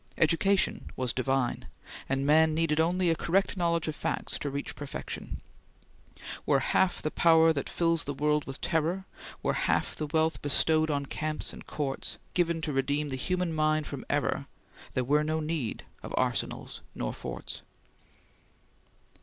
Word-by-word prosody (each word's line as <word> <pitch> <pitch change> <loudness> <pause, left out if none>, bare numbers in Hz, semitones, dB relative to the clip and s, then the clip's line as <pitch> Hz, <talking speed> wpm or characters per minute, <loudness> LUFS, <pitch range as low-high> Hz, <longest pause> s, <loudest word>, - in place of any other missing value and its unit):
Education 185 +5 +2
was 125 -2 -1
divine, 130 -1 0 0.4
and 135 +1 +1
man 155 +1 +5
needed 160 -1 +2
only 175 +2 +3
a - - +2
correct 190 +6 +1
knowledge 170 -3 +1
of 155 - -2
facts - - -2
to 145 - -2
reach 140 +1 -4
perfection: 145 -1 -6 1.0
"Were - - +3
half 190 -2 +1
the 155 - -1
power 165 -1 +5
that 140 -3 -3
fills 165 -2 +1
the 145 - -2
world 150 +1 +1
with 135 0 -7
terror, 170 +4 0 0.4
Were - - +2
half - - +1
the 155 - -3
wealth 160 +1 +1
bestowed 155 +2 +3
on 140 -1 0
camps 155 +2 -3
and - - -11
courts, 140 -3 -3 0.2
Given 170 -2 +1
to 150 -2 -2
redeem 145 +2 0
the 130 - -2
human 180 +5 -1
mind 155 0 +2
from - - -6
error, - - 0 0.5
There 130 - +2
were 145 +4 +3
no 155 +1 0
need 155 -6 -2 0.2
of - - -5
arsenals - - -1
nor - - -2
forts." - - -6
155 Hz, 155 wpm, -29 LUFS, 145-165 Hz, 1.0 s, man